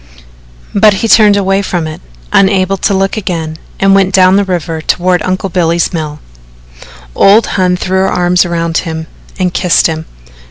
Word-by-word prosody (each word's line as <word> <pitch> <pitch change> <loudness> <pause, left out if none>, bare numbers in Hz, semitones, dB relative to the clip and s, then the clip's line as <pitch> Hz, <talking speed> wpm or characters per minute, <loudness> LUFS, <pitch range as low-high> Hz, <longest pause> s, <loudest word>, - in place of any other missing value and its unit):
But 205 0 +4
he - - +1
turned 210 -2 +5
away 195 0 0
from 175 -4 -3
it, 155 0 -8 0.3
unable 195 -1 +2
to 200 +1 -1
look 195 +2 -1
again, 165 -6 -4 0.2
and 195 0 +3
went 195 -1 +2
down 185 0 +4
the 200 - +2
river 175 -4 -3
toward 180 +2 0
Uncle 185 +1 -2
Billy's 170 -1 0
mill. 155 -2 -5 0.9
Old 205 - +4
Hon 180 -2 +1
threw 190 +1 -1
her 190 - +1
arms 180 0 +2
around 170 -2 -2
him 160 -2 -5 0.3
and 180 -2 -1
kissed 180 -2 +2
him. 160 0 -2
185 Hz, 165 wpm, -11 LUFS, 170-195 Hz, 0.9 s, turned